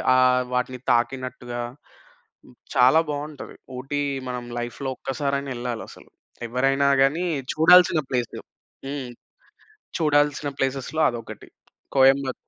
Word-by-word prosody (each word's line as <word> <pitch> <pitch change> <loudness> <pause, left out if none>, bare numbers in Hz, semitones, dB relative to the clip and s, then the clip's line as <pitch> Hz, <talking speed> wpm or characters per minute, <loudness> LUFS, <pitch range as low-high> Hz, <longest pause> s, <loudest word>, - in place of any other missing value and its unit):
ఆహ్, 125 0 +4
వాటిని 125 0 -1
తాకినట్టుగా 125 0 -1 1.1
చాలా 130 +6 +6
బావుంటది. 145 0 -6 0.2
ఊటీ 145 +3 -3 0.3
మనం 125 -1 -4 0.2
లైఫ్‌లో 120 +3 -4
ఒక్కసారైనా 140 +1 -2
ఎళ్ళాలసలు. 120 -2 -6 0.4
ఎవ్వరైనా 135 +3 +1 0.2
గాని 160 +6 +1 0.3
చూడాల్సిన 165 0 +6
ప్లేసు. 125 -2 -2 0.5
హ్మ్. 135 -3 -5 0.9
చూడాల్సిన 145 -1 +2
ప్లేసెస్‌లో 135 +3 -2
అదొకటి. 115 -2 -9 0.5
కోయంబత్ 135 0 +4
135 Hz, 90 wpm, -24 LUFS, 125-145 Hz, 1.1 s, చాలా